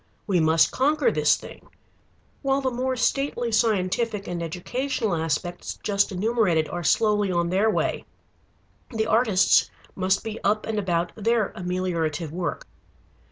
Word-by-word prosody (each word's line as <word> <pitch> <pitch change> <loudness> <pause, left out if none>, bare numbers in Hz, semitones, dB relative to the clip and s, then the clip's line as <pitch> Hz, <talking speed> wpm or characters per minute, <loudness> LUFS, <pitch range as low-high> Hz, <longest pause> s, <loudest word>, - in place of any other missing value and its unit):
We 190 -4 +1
must 160 0 +4
conquer 300 - +2
this - - +3
thing. - - -12 0.7
While 275 -1 +1
the 260 -1 -1
more 255 +2 -1
stately 250 -2 0
scientific 215 -1 0
and 175 -1 -4
educational 225 - -2
aspects 165 +2 -3
just 200 0 +1
enumerated 190 -5 +1
are 175 - -4
slowly 210 0 +2
on 170 -1 0
their 200 +4 +3
way, - - -1 0.8
the 220 -2 -1
artists 220 -4 +3 0.2
must 190 0 0
be 220 0 -6
up 210 +1 +1
and 220 -1 -2
about 175 -3 -1
their 225 -1 +1
ameliorative 175 -4 -2
work. 180 - -4
200 Hz, 135 wpm, -24 LUFS, 175-230 Hz, 0.8 s, must